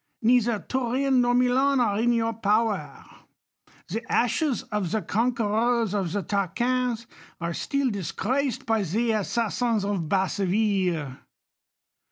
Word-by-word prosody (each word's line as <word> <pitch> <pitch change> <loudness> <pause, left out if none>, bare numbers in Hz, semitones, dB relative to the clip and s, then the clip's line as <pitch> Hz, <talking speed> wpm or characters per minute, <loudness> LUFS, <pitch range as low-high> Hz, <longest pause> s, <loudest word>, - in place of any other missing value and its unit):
Neither 235 -1 +3
1'urin 260 +4 0
nor 245 0 +3
MiU^n 260 +3 +3
are 215 -5 +1
in 240 +1 +3
your 230 -1 +1
poweiv 210 -5 -1 0.8
The 225 +6 -4
ashes 245 +2 +1
of 210 -4 -1
the 220 +2 -1
conquerors 230 -1 +1
of 190 -5 -1
the 200 +1 -2
Tarqunis 235 +6 -1 0.3
are 170 -1 -2
stiM 275 +6 -1
disgraced 230 - -2
by 225 -1 +1
the 220 +6 0
assassins 225 +1 0
of 190 -6 -2
Basseville. 190 -6 0
225 Hz, 120 wpm, -25 LUFS, 200-245 Hz, 0.8 s, Neither